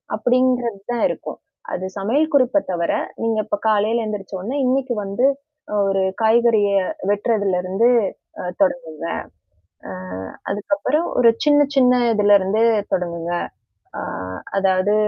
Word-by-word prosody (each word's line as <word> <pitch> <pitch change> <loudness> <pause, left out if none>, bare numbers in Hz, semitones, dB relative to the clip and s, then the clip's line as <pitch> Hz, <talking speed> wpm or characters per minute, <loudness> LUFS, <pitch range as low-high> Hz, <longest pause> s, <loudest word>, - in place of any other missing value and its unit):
அப்படிங்கிறதுதான் 245 -2 0
இருக்கும். - - -6 0.4
அது 185 +1 -3
சமையல் 275 +11 +1
குறிப்பைத் 270 -2 +2
தவிர, 170 -2 0 0.3
நீங்க 225 -1 0
இப்ப 210 -1 -2
காலையில 220 +2 +2
எந்திரிச்ச 205 -2 -6
உடனே 240 +10 -4
இன்னைக்கு 260 0 0
வந்து 200 +6 0 0.6
ஒரு 195 0 +1 0.2
காய்கறியை 220 -3 +3 0.3
வெட்டுறதுல 205 -2 +1
இருந்து, 190 +6 +1 0.5
அ - - -5 0.2
தொடங்குங்க. 260 - -1 0.8
அ. - - -6 0.6
அதுக்கப்புறம் 295 +9 -1
ஒரு 235 -2 +7 0.2
சின்னச் 290 -1 +4
சின்ன 250 -2 +5 0.2
இதுல 205 -1 +5
இருந்து 195 +4 0 0.3
தொடங்குங்க. 170 -1 -2 0.7
அ. - - -3 0.6
அதாவது 190 +1 +2
215 Hz, 115 wpm, -20 LUFS, 195-250 Hz, 0.8 s, ஒரு